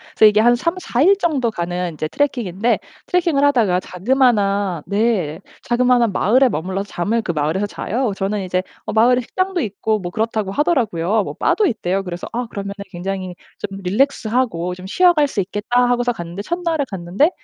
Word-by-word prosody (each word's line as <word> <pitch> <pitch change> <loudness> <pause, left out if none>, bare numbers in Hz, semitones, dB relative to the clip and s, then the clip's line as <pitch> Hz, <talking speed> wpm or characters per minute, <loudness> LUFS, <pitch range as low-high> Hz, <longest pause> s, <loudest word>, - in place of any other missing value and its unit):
그래서 - - +6
이게 210 0 +4
한 240 +2 +5
3-4 335 -2 -1
일 390 +4 +6
정도 280 - 0
가는 175 -2 -3
이제 155 0 -3
트레킹인데 235 - 0 0.3
트레킹을 335 -6 +1
하다가 230 -11 +3
자그마한 200 - +1
네 200 -7 0 0.2
자그마한 240 -2 +2
마을에 250 +8 +4
머물러서 190 +5 -3
잠을 215 +7 -1
그 180 - -2
마을에서 160 +6 -1
자요. 235 +3 -2
저는 195 +2 -2
이제 185 0 -1 0.2
어 - - -3
마을에 245 +3 +4
식당도 370 +7 -2
있고 215 -1 -1
뭐 175 - -5
그렇다고 215 -1 -1
하더라고요. 220 - +1
뭐 - - -6
바도 425 - +2
있대요. 195 - -1
그래서 175 -1 -6
'아 240 +1 -2
그러면은 200 -2 -5 0.2
굉장히 185 0 -4 0.2
좀 195 -1 -6
relax 220 +6 +1
하고 210 -8 0
좀 185 +1 -9
쉬어 355 - +4
갈 300 -3 +3
수 250 - -4
있겠다.' 210 +6 0
하고서 245 0 +1
갔는데 175 -3 -6
첫날에 335 - -1
갔는데 190 - +1
215 Hz, 405 characters per minute, -19 LUFS, 185-250 Hz, 0.3 s, 그래서